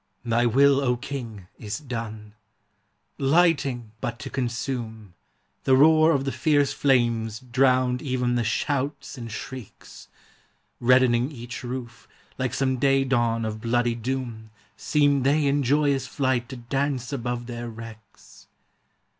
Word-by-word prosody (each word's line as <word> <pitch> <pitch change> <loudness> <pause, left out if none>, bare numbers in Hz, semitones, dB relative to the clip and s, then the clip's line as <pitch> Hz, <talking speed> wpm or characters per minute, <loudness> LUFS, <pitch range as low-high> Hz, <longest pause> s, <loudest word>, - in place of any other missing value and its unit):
Thy 120 +1 +2
will, 140 +3 +4
O 125 -3 +1
King, 120 -7 -7
is 105 -1 -4
done! 115 -7 -6 0.9
Lighting 140 -6 +2
but 120 - -3
to - - -8
consume, 115 -5 -4 0.5
The 130 - +4
roar 155 +3 +6
of 135 -2 0
the 135 - -1
fierce 145 +2 +2
flames 115 -5 +1
drowned 125 0 +2
even 125 -2 -1
the 120 -1 +1
shouts 140 +7 -2
and 115 -4 -7
shrieks; 125 +1 -9 0.7
Reddening 125 +1 +3
each 120 -3 -8
roof, 125 -1 -7 0.3
like 130 -1 -1
some 130 -1 0
day 135 +1 +3
dawn 120 -3 +1
of 110 0 -4
bloody 120 +1 +1
doom, 120 -2 -4 0.3
Seemed 145 -3 +2
they 145 +3 +2
in 140 +1 +2
joyous 140 0 +1
flight 130 -3 -1
to 130 - -6
dance 135 +1 -2
above 120 -2 -3
their 120 0 -6
wrecks. 115 -1 -13
125 Hz, 130 wpm, -25 LUFS, 115-135 Hz, 0.9 s, roar